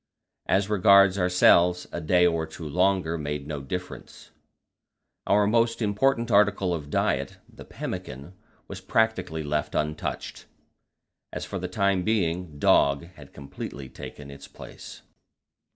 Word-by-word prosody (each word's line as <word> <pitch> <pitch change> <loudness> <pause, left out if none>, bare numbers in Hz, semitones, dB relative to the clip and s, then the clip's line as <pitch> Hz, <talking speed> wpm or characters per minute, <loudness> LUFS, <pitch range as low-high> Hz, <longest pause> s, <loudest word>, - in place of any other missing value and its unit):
As 95 +1 +2
regards 100 -1 +5
ourselves, 90 0 +3
a 85 - -5
day 90 +2 +3
or 85 -2 0
two 80 0 -9
longer 90 0 +1
made 75 -1 -4
no 75 -1 -5
difference; 90 +7 -8 1.0
our 105 0 +3
most 115 +2 +1
important 115 +3 0
article 100 -3 +3
of 75 -4 -6
diet, - - -1
the - - -14
pemmican, 70 +7 -7 0.3
was - - -8
practically 95 -8 0
left 75 0 -2
untouched, 75 0 -4 0.8
as - - -5
for - - -5
the - - -4
time 100 -1 0
being 90 -6 -1
dog 70 +2 +2
had 70 -4 -15
completely 70 -1 -9
taken 70 +1 -10
its 70 0 -12
place. - - -12
90 Hz, 130 wpm, -25 LUFS, 75-100 Hz, 1.0 s, regards